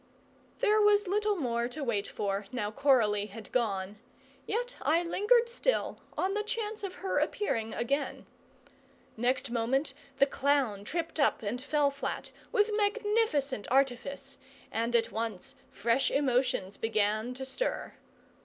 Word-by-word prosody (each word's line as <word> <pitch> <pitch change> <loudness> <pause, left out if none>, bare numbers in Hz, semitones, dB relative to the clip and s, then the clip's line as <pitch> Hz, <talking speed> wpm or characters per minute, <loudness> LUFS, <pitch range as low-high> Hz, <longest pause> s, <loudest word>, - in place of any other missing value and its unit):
There 430 -3 +4
was 415 -1 +4
little 415 +2 +1
more 240 -7 0
to 275 +4 -6
wait 215 -6 0
for, 200 0 -2
now 210 -4 -2
Coralie 220 -6 +3
had 215 +1 -10
gone; 205 -4 -1 0.5
yet 485 +3 -2
I 335 +3 +3
lingered 445 +7 +3
still, - - 0 0.2
on 380 +1 +1
the 420 - 0
chance 430 -1 -4
of 380 -2 -4
her - - +2
appearing 230 - -1
again. 275 +5 -1 0.9
Next 250 +2 0
moment 250 +5 0 0.2
the 275 - +6
clown 270 -7 +1
tripped 330 +4 -3
up 280 - +2
and 225 +5 -2
fell 290 0 +2
flat, 280 0 -4 0.2
with 420 +1 +3
magnificent 410 - +1
artifice, 270 +1 0 0.3
and 230 +2 0
at 230 - +2
once 220 -4 -3 0.2
fresh 235 +4 +1
emotions 250 -8 +1
began 220 +2 0
to 265 +1 -5
stir. 385 - -3
270 Hz, 135 wpm, -30 LUFS, 230-380 Hz, 0.9 s, the